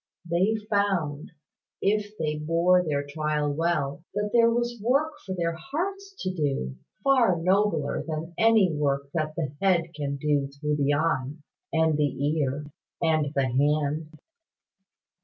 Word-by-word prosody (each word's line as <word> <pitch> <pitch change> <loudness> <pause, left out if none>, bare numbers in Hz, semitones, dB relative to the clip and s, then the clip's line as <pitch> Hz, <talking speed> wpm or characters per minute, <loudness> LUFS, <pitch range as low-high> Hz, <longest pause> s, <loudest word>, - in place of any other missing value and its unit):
They 185 +6 +2
found, 190 -9 0 0.5
if 210 +1 0
they 150 -3 -2
bore 170 +4 +3
their 145 -3 -1
trial 150 0 -1
well, 160 -1 -1
that 210 0 -1
there 230 -1 +6
was 240 -1 -1
work 280 +8 +2
for 190 - -4
their 170 -2 0
hearts 385 - -4
to 185 - -1
do, 135 - -1 0.3
far 245 -10 +4
nobler 185 -4 +1
than 160 +2 -5
any 220 -6 +4
work 140 -1 -1
that 155 -2 -2
the 150 -5 -3
head 170 -4 +2
can 140 -2 -3
do 145 -1 +1
through 145 +2 -2
the 145 0 +2
eye, 145 -3 0 0.4
and 160 -2 +2
the 145 -1 0
ear, 140 +1 -1 0.3
and 155 -3 +1
the 140 -1 +2
hand. 150 +4 0
160 Hz, 140 wpm, -26 LUFS, 145-200 Hz, 0.5 s, there